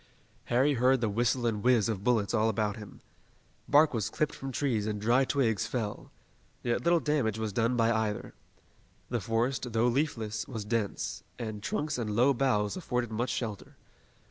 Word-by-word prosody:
Harry 130 +5 +3
heard 130 +1 +3
the 115 - 0
whistle 120 +3 +1
and 110 -3 0
whizz 120 -4 +4
of 105 -4 -3
bullets 115 -4 +1
all 110 -1 +3
about 105 -1 0
them. 105 -2 -11 0.7
Bark 150 +1 +5
was 110 -6 -1
clipped 155 - -1
from 135 0 -6
trees 120 -6 0
and 105 -1 -2
dry 120 +5 +3
twigs 120 -7 +1
fell. 105 -5 -4 0.5
Yet 120 -1 0
little 170 0 +4
damage 140 -9 0
was 110 -2 -3
done 115 +3 +1
by 115 0 +3
either. 110 -2 -2 0.8
The 120 -2 0
forest, 115 +5 -1
although 115 0 +1
leafless, 115 -5 -1
was 115 -6 -5
dense, 110 -2 -2 0.2
and 110 -3 -5
trunks 155 - -2
and 105 -3 -2
low 125 +5 +4
boughs 110 -6 +1
afforded 125 -10 -2
much 120 +3 -1
shelter. 110 -5 -4
115 Hz, 170 wpm, -30 LUFS, 110-130 Hz, 0.8 s, Bark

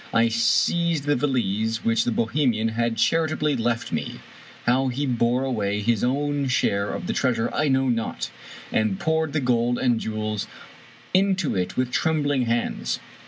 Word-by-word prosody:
I 115 0 +4
seized 155 +7 +2
the 145 0 +1
valise 115 -4 0
which 115 0 +2
the 120 - +1
Bohemian 115 -1 +1
had 115 0 -1
charitably 155 +2 +1
left 115 -1 -1
me - - -3 0.2
— - - -20
^how 130 +2 +2
he 140 +4 -2
bore 120 0 +1
away 105 -6 -1
his 115 -1 +1
owji 140 +2 0
share 100 -5 +1
of - - -4
the - - -1
treasure 120 -3 0
I 155 - +1
know 130 -1 +2
not 115 -2 -2 0.2
— - - -15
and 110 -3 0
poured 160 -1 0
the 155 - +1
gold 120 -2 +1
and 120 -3 +1
jewels 110 -1 -3 0.7
into 190 - +2
it 90 -1 -2
with 125 -1 0
trembling 145 -4 +1
hands. 115 0 -1
120 Hz, 165 wpm, -24 LUFS, 115-145 Hz, 0.7 s, I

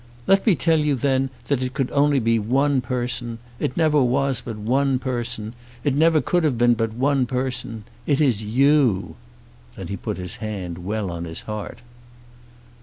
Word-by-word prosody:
"Let 195 +4 +3
me 200 - +6
tell 160 -1 +2
you 150 -2 +1
then 135 +1 +1 0.2
that 140 -3 0
it 130 0 -3
could 135 -2 -1
only 145 0 +3
be 115 -2 +2
one 135 +5 +1
person. 120 -1 -3 0.2
It 125 - -2
never 155 -3 +3
was 130 +1 +1
but 115 -3 -6
one 130 +5 +1
person. 120 -4 -3 0.3
It 145 - +1
never 160 +2 +4
could 175 +7 +1
have 145 -6 +1
been 120 +1 +4
but 115 -1 -1
one 135 0 +1
person. 125 -3 -3 0.2
It 140 -2 +2
is 125 -8 +2
you." 125 -2 +2 0.6
Then 95 -4 -7
he 100 - -3
put - - -4
his 90 +5 -1
hand 100 -6 -5
well 100 +1 -3
on 85 0 -5
his 80 0 -6
heart. 105 0 -7
125 Hz, 180 wpm, -22 LUFS, 110-140 Hz, 0.6 s, me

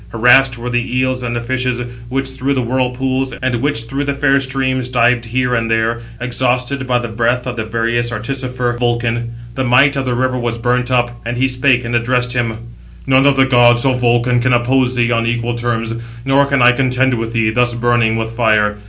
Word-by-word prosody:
Harassed 125 +3 +4
were 120 +1 -5
the 120 +1 -1
eels 130 0 0
and 120 -1 -3
the 120 - -2
fishes, 125 0 -2 0.3
which 135 +1 -2
through 135 +1 -2
the 130 - 0
whirlpools, 130 +2 -1
[and] 130 -1 -1
which 140 -5 0
through 135 +5 -4
the 140 0 -2
fair 140 -1 +2
streams 130 -1 -1
dived 125 -1 +1
here 125 +2 -1
and 115 -1 -1
there, 115 +1 0 0.2
exhausted 125 +2 -1
by 125 -1 +2
the 120 -1 -3
breath 120 +2 -1
of 125 -1 -4
the 115 - -3
various 115 +1 -1
artificer 125 +1 -3
Vulcan. 120 -1 -1 0.2
The 130 - -2
might 130 +3 +4
of 135 -1 -2
the 125 - 0
river 130 0 -1
was 120 -1 -2
burnt 125 +1 0
up, 120 -1 -1
and 120 +1 -4
he 130 +2 +2
spake, 125 -1 +1
and 120 +1 -2
addressed 125 +1 0
him: 115 -3 -1 0.5
"None 135 +1 +4
of 140 - +4
the 135 - +5
gods, 120 -1 +4
O 135 - +3
Vulcan, 120 0 +1
can 125 +1 +1
oppose 125 +1 +1
thee 120 -1 +1
on 115 0 +1
equal 120 0 -1
terms, 115 -1 -2 0.3
nor 135 +1 +3
can 140 -3 +2
I 125 - +7
contend 130 0 +1
with 115 -1 -3
thee, 110 -2 +1
thus 120 +1 +1
burning 120 -2 +1
with 115 0 -3
fire. 110 -3 +1
125 Hz, 210 wpm, -16 LUFS, 120-130 Hz, 0.5 s, I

